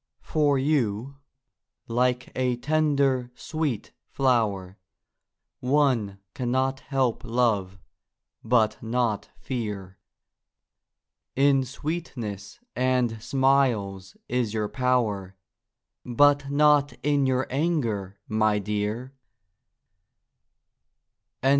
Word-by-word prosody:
For 145 -3 +2
you, 135 -2 0 0.7
like 125 +1 0
a 125 -1 +1
tender, 140 -2 +1
sweet 155 -9 -3 0.2
flower, 105 -8 0 0.8
One 125 -7 +1 0.2
cannot 130 +2 0
help 135 -4 -1
love, 115 -6 0 0.7
but 115 -2 +2
not 115 -2 -1
fear; 105 -7 -5 1.4
In 135 0 +4
sweetness 130 - -5 0.2
and 125 -3 +1
smiles 115 -9 +1
is 120 -3 -1
your 105 -1 -1
power, 110 -7 0 0.7
But 140 +3 +3
not 145 0 +4
in 145 -2 +2
your 130 0 +1
anger, 115 - -1
my 110 -1 +2
dear! 105 +5 -3
125 Hz, 80 wpm, -26 LUFS, 105-140 Hz, 1.4 s, In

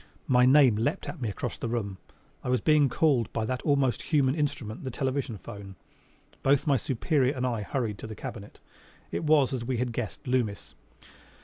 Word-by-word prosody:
My 125 0 +4
name 130 -5 +6
leapt 145 - -1
at 160 - -7
me 115 - -1
across 100 - -4
the - - -4
room: 105 -5 -3 0.4
I - - -3
was 125 0 +2
being 150 -3 +4
called 125 -4 +2
by 110 - -1
that 130 +2 -2
almost 140 -5 +1
human 140 -4 +2
instrument, 140 -7 -3
the 130 - -3
television 130 -2 -2
'phone. 100 0 -10 0.7
Both 135 +2 +3
my 145 -3 +3
superior 135 +3 +1
and 130 0 -1
I 120 -4 -1
hurried 110 -1 -3
to - - -7
the 110 - -7
cabinet. 115 -5 -8 0.5
It - - -2
was, 150 -4 +4
as 125 -3 -2
we 125 +1 -2
had 120 0 -1
guessed, 115 -2 -5
Loomis. 125 -6 -1
125 Hz, 190 wpm, -28 LUFS, 115-140 Hz, 0.7 s, name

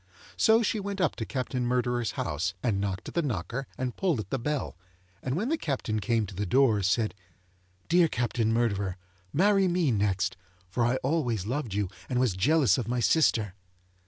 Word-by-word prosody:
So, 225 +1 +4
she 215 - 0
went 200 0 -4
up 180 -5 +1
to 110 - -3
Captain 130 -1 -2
Murderer's 120 -1 0
house, 80 +3 -2
and 105 -5 +1
knocked 95 -2 -3
at - - -11
the 170 - +1
knocker 125 - -3
and 125 -1 -3
pulled 175 - 0
at 100 -2 -6
the 135 - 0
bell, 150 +3 -2 0.5
and 130 +1 -2
when 215 - -1
the 325 +1 0
Captain 125 -7 -2
came 115 0 +1
to 100 - -9
the 100 +2 -3
door, 120 -2 +4
said: 105 +1 +1 0.7
'Dear 175 0 +5
Captain 120 -4 0
Murderer, 100 -5 0 0.3
marry 195 +3 +3
me 175 -5 +2
next, 100 -2 0 0.3
for 120 +7 -1
I 120 - +1
always 125 - 0
loved 120 -3 -3
you 105 -1 0 0.2
and 125 - 0
was 125 -6 +2
jealous 130 - +3
of 120 - -3
my 125 +1 0
sister. 115 - +2
120 Hz, 190 wpm, -28 LUFS, 105-150 Hz, 0.7 s, Dear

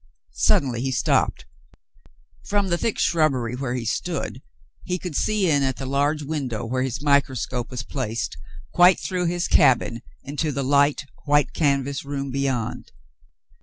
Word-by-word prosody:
Suddenly 120 -4 +2
he 135 +1 -1
stopped. 125 - +1 1.0
From 200 -2 +1
the 170 - +1
thick 225 - -1
shrubbery 135 -8 +1
where 125 -1 -3
he 120 -2 -3
stood 110 - -3 0.4
he 180 - -2
could 180 -4 -6
see 210 +2 +1
in 145 -3 +3
at 135 -2 0
the 135 - -5
large 145 +3 0
window 135 -6 -3
where 130 +3 -1
his 130 +2 -3
microscope 130 -4 +1
was 125 -1 -5
placed 115 - -3 0.4
quite 180 +1 +6
through 180 -2 -2
his 175 +1 -1
cabin 120 -2 +3 0.2
into 150 +2 -2
the 140 0 -2
light, 145 +2 +2 0.2
white 145 -1 +2
canvas 140 -2 0
room 140 -1 -4
beyond. 135 -4 -2
140 Hz, 150 wpm, -23 LUFS, 130-155 Hz, 1.0 s, quite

